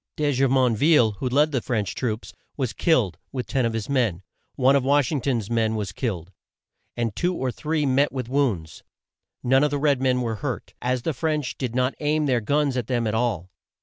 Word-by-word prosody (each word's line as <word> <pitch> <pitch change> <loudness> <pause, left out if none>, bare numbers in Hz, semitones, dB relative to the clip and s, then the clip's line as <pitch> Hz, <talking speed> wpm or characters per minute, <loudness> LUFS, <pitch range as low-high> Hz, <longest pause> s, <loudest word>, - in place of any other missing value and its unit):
De 150 -1 +1
Ju 135 0 +2
mon 130 -3 +3
ville, 140 -3 +4
who 130 - -1
led 145 +4 +3
the 130 -4 0
French 105 -6 -2
troops, 115 -3 -3 0.2
was 130 -5 -1
killed, 115 - +1
with 125 -2 -3
ten 130 -3 0
of 115 - -3
his 110 -2 -3
men. 115 -10 0 0.3
One 135 +1 +4
of 140 - +2
Wash 140 0 +2
ing 145 -4 -1
ton's 120 -7 -1
men 110 -1 +1
was 105 -3 -3
killed, 95 -7 -4 0.7
and 115 -4 -1
two 180 +1 0
or 130 -4 -1
three 155 +3 -1
met 140 +2 +2
with 130 -3 -4
wounds. 120 - -1 0.6
None 135 +3 +4
of 150 - +3
the 145 - -1
red 140 -2 +2
men 130 -1 +2
were 115 -3 -2
hurt, - - -5
as 125 -1 -1
the 160 - -1
French 150 -1 -2
did 125 -3 -4
not 130 +1 +1
aim 150 0 +1
their 125 -4 +1
guns 140 +2 +1
at 120 -3 -2
them 120 -3 0
at 110 - -1
all. 110 -6 -1
130 Hz, 215 wpm, -24 LUFS, 115-140 Hz, 0.7 s, ville